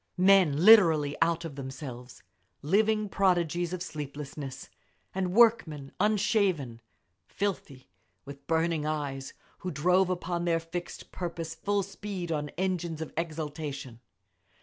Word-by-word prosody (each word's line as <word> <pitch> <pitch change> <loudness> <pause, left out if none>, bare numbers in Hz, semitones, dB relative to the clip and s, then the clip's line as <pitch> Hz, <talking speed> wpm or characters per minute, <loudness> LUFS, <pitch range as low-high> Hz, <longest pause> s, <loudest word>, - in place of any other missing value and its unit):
Men 180 -4 +5
literally 165 -10 +7
out 170 0 +2
of 160 - -6
themselves, 130 -2 -8 0.4
living 215 +6 +2
prodigies 175 -3 +1
of 185 -1 -3
sleeplessness 140 -3 -7 0.5
and 185 -1 -1
work 230 0 +5
men 145 -3 -8
unshaven, 195 - +1 0.5
filthy, 160 - -4 0.4
with 140 0 -11
burning 165 -1 +1
eyes, 145 -3 -3 0.2
who 185 - -4
drove 180 +3 +2
upon 175 -1 -2
their 165 -1 +2
fixed 170 +2 -7
purpose 170 -2 -5
full 200 +4 -1
speed 195 -2 -6
on 150 -2 -2
engines 175 -3 -2
of 160 - -6
exaltation. 150 -6 -5
165 Hz, 120 wpm, -29 LUFS, 145-185 Hz, 0.5 s, literally